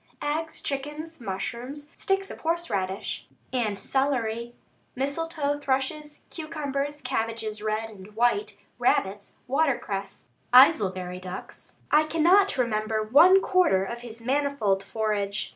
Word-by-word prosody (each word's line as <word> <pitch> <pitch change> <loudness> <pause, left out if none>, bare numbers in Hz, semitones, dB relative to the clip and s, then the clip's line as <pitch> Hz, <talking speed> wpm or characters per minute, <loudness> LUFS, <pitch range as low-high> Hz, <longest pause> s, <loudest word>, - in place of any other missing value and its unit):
Eggs, 315 +2 -2
chickens, 295 +3 -4
mushrooms, 250 +8 -5
sticks 390 0 -1
of - - -9
horseradish 210 - -2 0.3
and 220 -5 0
celery, 240 -3 -1 0.4
misletoe 290 +1 -1
thrushes, 290 +3 -2
cucumbers, 290 -2 -3
cabbages 225 -4 -2
red 215 +1 -1
and 210 -1 -13
white, 245 - +1 0.2
rabbits, 200 +1 +1
watercress, 245 -9 -1 0.3
Aylesbury 190 - +5
ducks 185 0 -8 0.2
I 305 +1 +5
cannot 350 +5 +4
remember 215 -3 0
one 330 - +7
quarter 350 - +3
of 235 +5 -5
his 235 -1 -9
manifold 255 -6 +1
forage. 205 -2 -2
250 Hz, 110 wpm, -26 LUFS, 215-295 Hz, 0.4 s, one